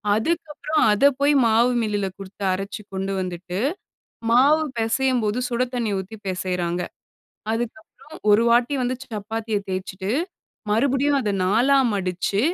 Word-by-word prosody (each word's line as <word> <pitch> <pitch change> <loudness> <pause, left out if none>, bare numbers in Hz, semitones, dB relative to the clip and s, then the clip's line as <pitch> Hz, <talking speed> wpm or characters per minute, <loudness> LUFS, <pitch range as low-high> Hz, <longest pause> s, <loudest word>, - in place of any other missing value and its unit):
அதுக்கப்புறம் 305 +3 -1
அதை 225 +7 +5
போய் 285 +1 +4
மாவு 230 +3 +4
மில்லில 205 -3 -1
கொடுத்து 195 +1 -9
அரைச்சு 195 +2 -5
கொண்டு 195 +1 -2
வந்துட்டு, 180 +1 -5 0.7
மாவு 290 +6 +5 0.2
பேசையும் 250 +2 +1
போது 210 +4 0
சுட 240 +1 +1
தண்ணீ 235 -3 -1
ஊத்தி 195 +4 -7
பேசையிறாங்க. 180 -1 -2 0.7
அதுக்கப்பறம் 240 +7 -6
ஒரு 210 +3 +6
வாட்டி 240 +4 +3
வந்து 250 +1 -1
சப்பாத்திய 220 0 -3
தேய்ச்சுட்டு 190 +1 -4 0.6
மறுபடியும் 275 +5 +2
அத 210 -4 -1
4ஆ 240 +9 +3 0.2
மடிச்சு 190 +1 -1
225 Hz, 125 wpm, -23 LUFS, 195-255 Hz, 0.7 s, ஒரு